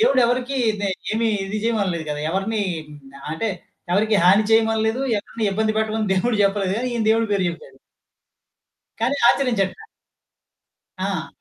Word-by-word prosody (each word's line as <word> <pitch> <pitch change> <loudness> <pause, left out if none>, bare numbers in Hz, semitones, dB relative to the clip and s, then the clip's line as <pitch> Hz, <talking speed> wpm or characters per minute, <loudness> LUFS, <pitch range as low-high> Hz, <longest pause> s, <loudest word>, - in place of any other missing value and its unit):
దేవుడు 275 - +4
ఎవరికీ 250 +3 -1 0.2
దే 200 - 0 0.2
ఏమి 225 +1 +1 0.2
ఇది 210 +2 -3
చేయమనలేదు 195 -8 0
కదా! 150 0 -3
ఎవరిని 200 +4 -1 0.3
హ్మ్. 150 -1 -12 0.3
అంటే 220 +8 -2 0.4
ఎవరికీ 210 +3 +3
హాని 195 +4 +6
చేయమనలేదు. 225 +1 +2 0.2
ఎవరిని 220 +2 -5
ఇబ్బంది 215 +2 0
పెట్టమని 220 -1 -1
దేవుడు 215 +4 +1
చెప్పలేదు 195 -1 0
కానీ 250 +2 -2
ఈయన 225 -2 -1
దేవుడి 225 -1 +2
పేరు 195 -2 +1
చెప్పాడు. 170 0 -9 1.2
కానీ 245 +5 +1
ఆచరించట్ల. 240 - 0 1.2
ఆ! - - -3
220 Hz, 135 wpm, -22 LUFS, 195-230 Hz, 1.2 s, హాని